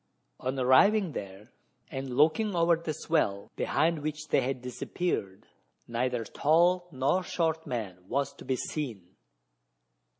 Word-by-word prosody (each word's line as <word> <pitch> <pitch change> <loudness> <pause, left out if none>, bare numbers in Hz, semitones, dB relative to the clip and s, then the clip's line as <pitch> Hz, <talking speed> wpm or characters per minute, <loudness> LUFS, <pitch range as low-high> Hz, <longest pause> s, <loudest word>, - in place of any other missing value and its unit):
On 130 +1 -2
arriving 175 +10 +5
there, 100 0 -8 0.4
and 135 -2 -4
looking 165 +8 +3
over 170 0 +4
the 165 -1 -4
swell, 145 -11 -1
behind 165 0 +1
which 155 +1 -4
they - - +3
had 130 0 -2
disappeared, 125 - -3 0.4
neither 120 0 -1
tall 175 - +3
nor 135 +7 +1
short 160 -3 -1
man 100 -7 -4
was 140 +3 -1
to - - -13
be 130 - 0
seen. 115 - -5
140 Hz, 130 wpm, -29 LUFS, 125-165 Hz, 0.4 s, arriving